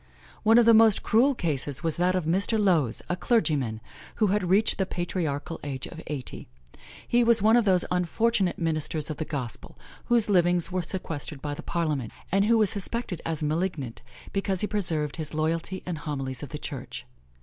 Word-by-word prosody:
One 225 Hz, +1 st, +5 dB
of 240 Hz, -, +6 dB
the 230 Hz, -, +7 dB
most 220 Hz, -2 st, +5 dB
cruel 260 Hz, +5 st, +3 dB
cases 145 Hz, -, -2 dB
was 165 Hz, -2 st, -1 dB
that 180 Hz, +1 st, +2 dB
of 180 Hz, -4 st, -1 dB
Mr. 195 Hz, +7 st, +1 dB
Lowes, 170 Hz, -, +2 dB
a 180 Hz, -, -1 dB
clergyman, 145 Hz, -, 0 dB, 0.3 s
who 220 Hz, -, +2 dB
had 195 Hz, -4 st, 0 dB
reached 205 Hz, +4 st, +3 dB
the 190 Hz, -, +1 dB
patriarchal 165 Hz, -4 st, -3 dB
age 135 Hz, -3 st, -4 dB
of 165 Hz, -, -9 dB
eighty. 140 Hz, -4 st, -6 dB, 0.6 s
He 240 Hz, 0 st, +3 dB
was 230 Hz, -3 st, +4 dB
one 220 Hz, +2 st, +6 dB
of 240 Hz, -2 st, +4 dB
those 185 Hz, -3 st, +3 dB
unfortunate 185 Hz, +2 st, +1 dB
ministers 155 Hz, -2 st, -2 dB
of 155 Hz, -, -5 dB
the 155 Hz, -, -3 dB
Gospel 130 Hz, -7 st, -6 dB, 0.3 s
whose 240 Hz, -3 st, +3 dB
livings 175 Hz, -3 st, +3 dB
were 185 Hz, 0 st, 0 dB
sequestered 160 Hz, -4 st, -5 dB
by 145 Hz, +1 st, -4 dB
the -, -, -7 dB
parliament, 150 Hz, -9 st, -2 dB, 0.2 s
and 195 Hz, +2 st, +3 dB
who 230 Hz, +1 st, +4 dB
was 215 Hz, -3 st, +4 dB
suspected 205 Hz, -3 st, -3 dB
as 160 Hz, -2 st, -2 dB
malignant 150 Hz, -5 st, -2 dB, 0.3 s
because 195 Hz, -2 st, 0 dB
he -, -, +1 dB
preserved 165 Hz, -9 st, -1 dB
his 155 Hz, -1 st, -5 dB
loyalty 165 Hz, +4 st, -2 dB
and 175 Hz, -3 st, -3 dB
the -, -, -10 dB
homilies 135 Hz, -4 st, -4 dB
of 145 Hz, -, -7 dB
the 150 Hz, -, -5 dB
Church. 135 Hz, -, -7 dB
175 Hz, 190 wpm, -26 LUFS, 150-200 Hz, 0.6 s, the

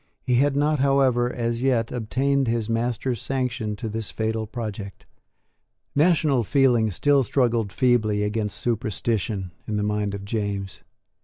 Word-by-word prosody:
He 125 Hz, -1 st, +2 dB
had 140 Hz, +2 st, +3 dB
not, 150 Hz, +1 st, +2 dB
however, 130 Hz, -3 st, +3 dB
as 115 Hz, -1 st, -2 dB
yet, 125 Hz, -4 st, +1 dB
obtained 135 Hz, +3 st, 0 dB
his 115 Hz, -2 st, 0 dB
master's 120 Hz, +1 st, -1 dB
sanction 125 Hz, -5 st, -2 dB
to 110 Hz, +2 st, -5 dB
this 110 Hz, -1 st, -4 dB
fatal 110 Hz, 0 st, -2 dB
project. 105 Hz, -4 st, -6 dB, 0.9 s
National 150 Hz, -5 st, +3 dB
feeling 120 Hz, -2 st, +3 dB
still 140 Hz, +9 st, +3 dB
struggled 120 Hz, -4 st, +1 dB
feebly 110 Hz, -1 st, +2 dB
against 105 Hz, -1 st, -2 dB
superstition 110 Hz, -4 st, -2 dB, 0.2 s
in 105 Hz, -, -1 dB
the 105 Hz, -, 0 dB
mind 105 Hz, -1 st, -1 dB
of 100 Hz, 0 st, -7 dB
James. 100 Hz, -3 st, -3 dB
115 Hz, 140 wpm, -24 LUFS, 105-130 Hz, 0.9 s, had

